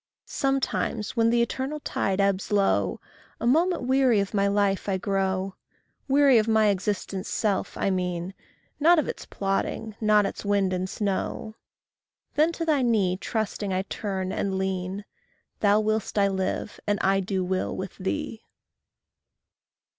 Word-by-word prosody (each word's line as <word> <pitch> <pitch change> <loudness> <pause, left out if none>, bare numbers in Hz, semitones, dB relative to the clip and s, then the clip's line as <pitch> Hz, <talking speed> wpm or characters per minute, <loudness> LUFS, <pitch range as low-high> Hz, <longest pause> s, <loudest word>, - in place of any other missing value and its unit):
Sometimes, 270 -5 -1
when 230 -1 +3
the 235 0 +3
eternal 265 +5 -3
tide 195 -8 -1
ebbs 200 0 +1
low, 150 - +2 0.4
A - - -3
moment 330 +6 +2
weary 260 -3 +3
of 200 +1 -2
my 200 -1 +2
life 200 0 +1
I 190 - +1
grow 190 0 -1 0.5
Weary 275 -3 +5
of 215 - 0
my 220 -1 +4
existence' 195 -1 -2
self, 205 -3 -1
I 195 - +1
mean, 180 0 -2 0.5
Not 335 +4 +6
of 310 - +1
its - - -6
plodding, 200 +2 -2
not 210 -1 +4
its - - -4
wind 200 -2 +1
and 185 +1 -2
snow 205 +2 -2 0.8
Then 310 +3 +3
to 330 - -3
thy 300 -4 +2
knee 210 -7 +2
trusting 210 0 -3
I 185 0 0
turn, 190 -2 -3
and 195 -1 -1
lean: 190 +1 -3 0.5
Thou 205 0 +4
will'st 215 0 -1
I 200 -1 +4
live, 190 +2 -3
and 205 0 +2
I 195 0 +3
do 190 -1 -1
will 185 +1 -2
with 190 0 -5
thee. 225 +4 -3
205 Hz, 150 wpm, -26 LUFS, 190-230 Hz, 0.8 s, Not